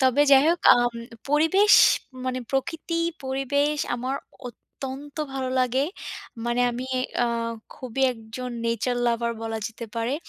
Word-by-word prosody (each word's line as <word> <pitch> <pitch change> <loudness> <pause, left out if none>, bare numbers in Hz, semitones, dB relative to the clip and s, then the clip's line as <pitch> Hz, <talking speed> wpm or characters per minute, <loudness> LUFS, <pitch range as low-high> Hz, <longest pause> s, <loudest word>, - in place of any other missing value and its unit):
তবে 260 +1 +3
যাই 270 -1 +8
হোক, 340 +1 +2
আম 240 0 +2 0.4
পরিবেশ 325 +8 +4 0.5
মানে 255 0 -1
প্রকৃতি, 320 +5 -2 0.3
পরিবেশ 280 +3 0 0.2
আমার 255 +3 -3 0.3
অত্যন্ত 270 +4 -9 0.2
ভালো 260 -1 -2
লাগে। 255 +2 +1 0.6
মানে 240 +1 +1
আমি 245 +2 -5 0.4
আ - - +1 0.5
খুবই 255 +1 -4
একজন 230 +2 -7 0.2
nature 235 +2 0
lover 235 0 +1
বলা 225 0 -3
যেতে 230 0 -8
পারে। 230 +4 0
255 Hz, 130 wpm, -25 LUFS, 240-280 Hz, 0.6 s, যাই